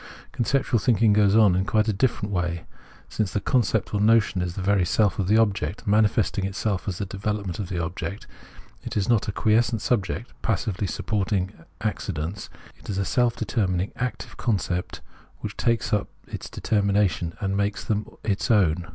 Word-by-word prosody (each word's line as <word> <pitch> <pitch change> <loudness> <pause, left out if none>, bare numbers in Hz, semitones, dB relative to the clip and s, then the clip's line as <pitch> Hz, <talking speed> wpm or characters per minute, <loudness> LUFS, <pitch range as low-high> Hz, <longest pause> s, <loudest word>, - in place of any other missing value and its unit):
Conceptual 125 0 +1
thinking 110 -2 +3
goes 100 -1 +4
on 105 -5 +6
in 95 - +2
quite 110 +2 +1
a 110 - +2
different 105 -1 0
way. 85 -2 -1 0.4
Since 105 -4 -2
the - - +1
concept 110 -2 +1
or 100 - +1
notion 105 -4 +3
is 90 -1 -3
the 100 - -4
very 100 -1 +3
self 105 +3 +2
of 95 - 0
the 105 +3 +4
object, 100 -6 0
manifesting 105 -1 +2
itself 95 0 -2
as 95 -3 -2
the 100 - -2
development 100 -1 -3
of 95 -4 -4
the 90 - -3
object, 85 +4 -4 0.6
it - - -5
is 100 - +1
not 115 -3 +2
a - - 0
quiescent 110 +3 +2
subject, 110 +1 -1
passively 105 -2 -1
sup - - -5
porting 95 -3 0 0.3
accidents: 95 -3 -3 0.3
it - - -13
is 100 - -2
a 100 - 0
self 120 +1 +2
determining 95 -4 -1
active 125 0 -4
concept 95 -6 -1 0.4
which - - -5
takes 115 -2 0
up 105 - +1 0.2
its - - -7
determinations 100 -5 +1
and 95 -1 -1
makes 100 0 -1
them 105 0 -1 0.2
its 100 -2 -1
own. 90 -6 +3
100 Hz, 175 wpm, -25 LUFS, 95-110 Hz, 0.6 s, on